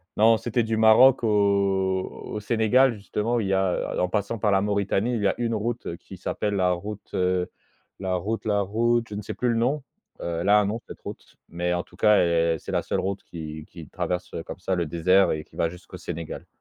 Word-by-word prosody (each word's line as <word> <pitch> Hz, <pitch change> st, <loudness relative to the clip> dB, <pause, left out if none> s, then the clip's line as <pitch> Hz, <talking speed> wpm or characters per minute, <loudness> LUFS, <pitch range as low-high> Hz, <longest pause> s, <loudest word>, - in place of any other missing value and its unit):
non, 110 Hz, +1 st, +5 dB
c'était 120 Hz, 0 st, 0 dB
du 110 Hz, 0 st, -1 dB
Maroc 115 Hz, +4 st, +6 dB
au -, -, +2 dB, 1.1 s
au 105 Hz, -, -2 dB
Sénégal 115 Hz, +4 st, +3 dB
justement, 110 Hz, +3 st, -1 dB
il 100 Hz, -, -2 dB
y 95 Hz, -, +1 dB
a, 95 Hz, -1 st, +2 dB, 0.2 s
heu, -, -, -2 dB
en 90 Hz, -, +2 dB
passant 105 Hz, +3 st, -2 dB
par 105 Hz, 0 st, +2 dB
la 95 Hz, -, +3 dB
Mauritanie, 100 Hz, +3 st, 0 dB
il 110 Hz, -, -2 dB
y 100 Hz, -, +3 dB
a -, -, +1 dB
une 115 Hz, -1 st, -1 dB
route 110 Hz, -5 st, -3 dB
qui 95 Hz, -, -12 dB
s'appelle 105 Hz, +3 st, -2 dB
la 90 Hz, -2 st, +2 dB
route, 100 Hz, +4 st, -6 dB
heu, 90 Hz, -1 st, 0 dB, 0.5 s
la 95 Hz, -1 st, -1 dB
route 105 Hz, +6 st, -3 dB
la 105 Hz, -1 st, +2 dB
route, 115 Hz, +4 st, +1 dB
je 105 Hz, -, -6 dB
ne 105 Hz, -, -4 dB
sais 110 Hz, -, -6 dB
plus 120 Hz, +5 st, -1 dB
le 115 Hz, -, +1 dB
nom. 130 Hz, +5 st, 0 dB, 0.4 s
Heu, 85 Hz, -1 st, -3 dB
elle 100 Hz, -, 0 dB
a 105 Hz, 0 st, +7 dB
un 105 Hz, -, +2 dB
nom 110 Hz, +3 st, -2 dB
cette -, -, -10 dB
route, -, -, -10 dB
mais 90 Hz, +1 st, -1 dB
en 90 Hz, -, -1 dB
tout -, -, -20 dB
cas, 105 Hz, -1 st, +5 dB
elle 85 Hz, -1 st, +2 dB
c'est -, -, -7 dB
la -, -, +1 dB
seule -, -, -2 dB
route 100 Hz, +1 st, -3 dB
qui 80 Hz, -2 st, -7 dB
qui -, -, -11 dB
traverse 90 Hz, 0 st, -3 dB
comme -, -, -8 dB
ça 95 Hz, 0 st, -1 dB
le 85 Hz, -1 st, 0 dB
désert 90 Hz, +5 st, +3 dB
et 75 Hz, 0 st, -4 dB
qui -, -, -19 dB
va 85 Hz, -, +2 dB
jusqu'au 90 Hz, +1 st, -10 dB
Sénégal. 85 Hz, -2 st, -6 dB
100 Hz, 235 wpm, -25 LUFS, 90-110 Hz, 1.1 s, a